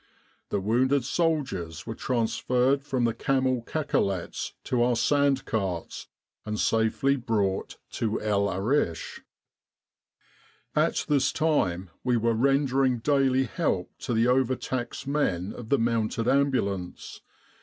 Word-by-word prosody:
The - - 0
wounded 125 +6 +2
soldiers 135 - -1
were 115 - -4
transferred 125 +3 0
from 130 -3 -1
the 115 -1 +2
camel 130 +1 0
cacolets 115 - -2
to 125 -2 0
our 120 0 +3
sand 140 +2 +2
carts 95 -6 -3 0.4
and 105 0 -4
safely 115 +5 +2
brought 105 -6 -1
to 110 -1 -1
El 100 -1 +1
Arish. 95 - -1 0.8
" - - -35
At - - -2
this 140 -3 +2
time 95 - 0
we 125 -1 +2
were 115 +1 +1
rendering 135 +1 +2
daily 135 +1 +2
help 130 - -1
to 120 - -2
the 115 +1 +3
overtaxed 130 -1 -1
men 105 -11 -1
of 115 -2 -9
the 140 - +4
Mounted 115 0 0
Ambulance. 125 -10 -1
120 Hz, 125 wpm, -27 LUFS, 105-135 Hz, 0.8 s, the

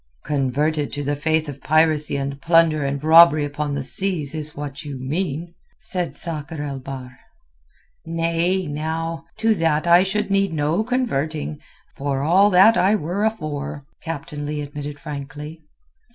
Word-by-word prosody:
"Converted 145 +2 0
to 145 - -3
the 145 +1 -1
faith 160 +2 0
of 140 -2 -8
piracy 155 -1 +2
and 140 0 -4
plunder 165 -3 +4
and 140 +1 -2
robbery 160 -2 +7
upon 145 0 -3
the 140 - -3
seas 165 -2 +1
is 155 -1 -4
what 145 -1 -6
you 145 -3 -6
mean," 160 +4 -3 0.2
said 180 -2 -3
Sakr 155 -2 -4
el 140 -2 -4
Bahr. 130 -1 -8 0.8
"Nay, 165 +3 0
now. 160 +2 -3
To 225 0 +3
that 165 -4 +1
I 175 +1 +7
should 195 +1 -1
need 195 -3 +2
no 155 +6 +1
converting, 155 - -2 0.4
for 140 -1 -2
all 190 +7 +5
that 200 +4 +6
I 195 +3 +4
were 185 +2 -2
afore," 150 -9 -3 0.2
Captain 150 -2 -5
Leigh 150 0 -3
admitted 145 0 -7
frankly. 150 +1 -7
155 Hz, 150 wpm, -22 LUFS, 145-170 Hz, 0.8 s, robbery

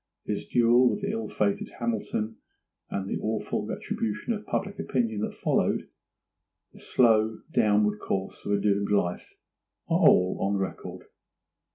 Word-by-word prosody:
His - - -3
duel 120 +1 +5
with 205 - -2
the 200 0 -1
ill 225 +1 -3
fated 100 -1 -1
Hamilton, 110 -1 -2 0.5
and 95 -1 -3
the - - -2
awful 110 0 -2
retribution 110 - -3
of 210 -1 -7
public 200 +1 -2
opinion 115 -5 -1
that - - -3
followed—the - - -4
slow 110 -3 +3
downward 105 -4 +3
course 95 -2 -3
of - - -3
a 100 - +2
doomed 100 0 +1
life, 90 -4 -1 0.5
are - - +2
all 90 0 +5
on 100 +1 +1
record. 95 -1 -5
110 Hz, 140 wpm, -27 LUFS, 100-120 Hz, 0.5 s, duel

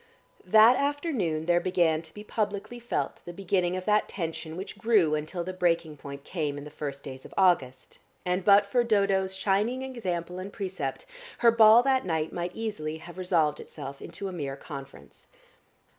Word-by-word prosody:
That 220 +5 +7
afternoon 280 - -1
there 175 0 +3
began 170 -4 +1
to 165 - -12
be 210 - -8
publicly 210 +2 -3
felt 230 - -3
the 175 - -7
beginning 185 -1 0
of 185 - -6
that 210 0 +2
tension 165 -2 -5
which 190 - -7
grew 210 -9 +3
until 155 +3 -2
the 185 +2 -5
breaking 170 -3 0
point 140 0 -9
came 150 -5 -3
in 145 - -7
the 150 - -10
first 140 -2 -6
days 130 -2 -8
of - - -13
August, 170 -9 +1 0.3
and 180 +1 0
but 200 +1 +6
for 240 +4 +2
Dodo's 200 -4 +1
shining 210 +7 0
example 185 -9 -4
and 190 +2 -6
precept, 185 -10 -4 0.4
her 235 - +9
ball 225 +1 +7
that 265 -1 +2
night 160 -3 -2
might 175 +1 -4
easily 205 -9 -4
have 175 +3 -11
resolved 165 -5 +1
itself 140 +1 -8
into 175 +4 -6
a - - -5
mere 140 -5 -4
conference. 140 -2 -11
180 Hz, 175 wpm, -28 LUFS, 160-210 Hz, 0.4 s, her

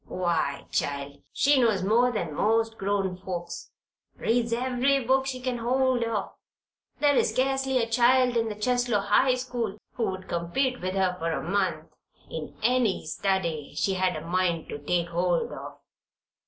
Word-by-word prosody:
Why, 170 -6 -1
child, 140 0 -2
she 280 -1 +3
knows 215 -6 +2
more 235 +5 +3
than 175 -9 -3
most 225 +5 +1
grown 195 -2 0
folks. 175 -2 -6 0.5
Reads 235 0 0
every 255 +2 +1
book 265 +2 +2
she 255 -1 -3
can 250 -1 -2
get 230 - -7
hold 255 0 +2
of; 225 -4 -2 0.7
there 290 -1 +4
is - - +3
scarcely 270 0 +1
a 230 -2 +1
child 245 +2 +4
in 225 -1 +1
the 210 - -5
Cheslow 245 -1 +1
High 255 +5 +3
School 240 -5 -3 0.2
who 195 -6 -1
could 185 - -15
compete 250 +10 -1
with 185 +1 -2
her 190 -2 +1
for 165 0 -1
a - - -2
month 185 -5 -1 0.4
in 160 -2 -6
any 240 -6 +2
study 170 -3 -2
she 195 - +1
had 185 -1 +1
a - - -6
mind 175 -1 0
to - - -5
take 170 +4 -1
hold 175 0 0
of. - - -8
210 Hz, 170 wpm, -27 LUFS, 180-250 Hz, 0.7 s, there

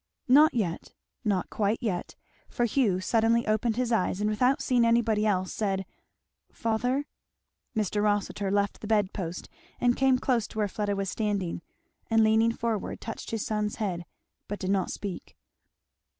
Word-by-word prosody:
Not 290 +3 +6
yet 185 -8 -2 0.3
not 200 -5 0
quite 210 +1 +1
yet; 200 -8 -3 0.3
for 240 - 0
Hugh 220 -6 +2
suddenly 230 +3 +2
opened 215 +1 +1
his 245 0 -1
eyes 195 -3 +1
and 210 - +1
without 250 +5 +2
seeing 245 -2 +2
anybody 230 -2 +3
else, 185 -3 0
said, 195 -3 -1 0.7
"Father 245 +5 0 0.3
" - - -52
Mr. 210 -1 0
Rossitur 205 -1 0
left 200 +1 0
the 210 - -6
bed 210 -3 +2
post 175 -3 -5 0.3
and 245 0 +3
came 265 -1 +3
close 245 -4 0
to - - -12
where 210 -1 +2
Fleda 205 0 -2
was 195 -1 -2
standing, 200 -6 -2 0.5
and 225 -1 +4
leaning 220 +1 +4
forward, 230 -3 -3
touched 225 - -7
his 225 -2 -2
son's 210 -1 -1
head, 180 -6 -3 0.4
but 205 - -4
did 190 0 -1
not 195 -2 +1
speak. 200 -3 -6
215 Hz, 165 wpm, -28 LUFS, 200-230 Hz, 0.7 s, Not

